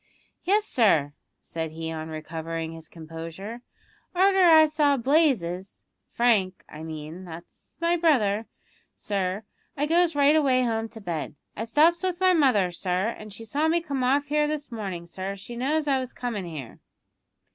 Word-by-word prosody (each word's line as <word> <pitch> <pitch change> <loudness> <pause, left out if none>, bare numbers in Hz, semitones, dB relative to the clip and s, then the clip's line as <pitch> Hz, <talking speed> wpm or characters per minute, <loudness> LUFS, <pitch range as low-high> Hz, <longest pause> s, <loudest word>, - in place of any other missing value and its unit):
"Yes, 415 +4 +3
sir," 165 - +2 0.3
said 160 -1 -4
he, 160 0 -5
on 160 0 -5
recovering 160 +1 -5
his 165 -1 -11
composure; 165 +8 -8 0.5
"arter 385 +2 +4
I 325 -4 +8
saw 300 -2 +2
Blazes 235 - +1 0.3
Frank, 210 -6 +1
I 155 - -10
mean, 160 +2 -7
that's 170 -1 -12
my 335 +1 +2
brother, 225 -10 +2 0.5
sir 195 0 -2 0.3
I 290 - +1
goes 335 +1 +2
right 290 +1 +5
away 265 -5 +3
home 225 -2 -1
to 225 0 -11
bed. 165 -6 -4 0.2
I 225 - -3
stops 315 +8 +3
with 365 -2 -1
my 370 -1 +5
mother, 250 - +3
sir, 180 +3 -1
an' 215 -2 -8
she 220 +3 -9
saw 290 +8 0
me 335 +2 +3
come 285 -6 -3
off 275 +3 +2
here 300 +1 +1
this 295 -2 -4
mornin', 195 -7 -5
sir. 190 +3 -5
She 200 +5 -9
knows 295 +6 0
I 270 -2 +2
was 255 -1 -6
comin' 230 -6 -4
here." 150 -8 -8
225 Hz, 165 wpm, -26 LUFS, -, 0.5 s, I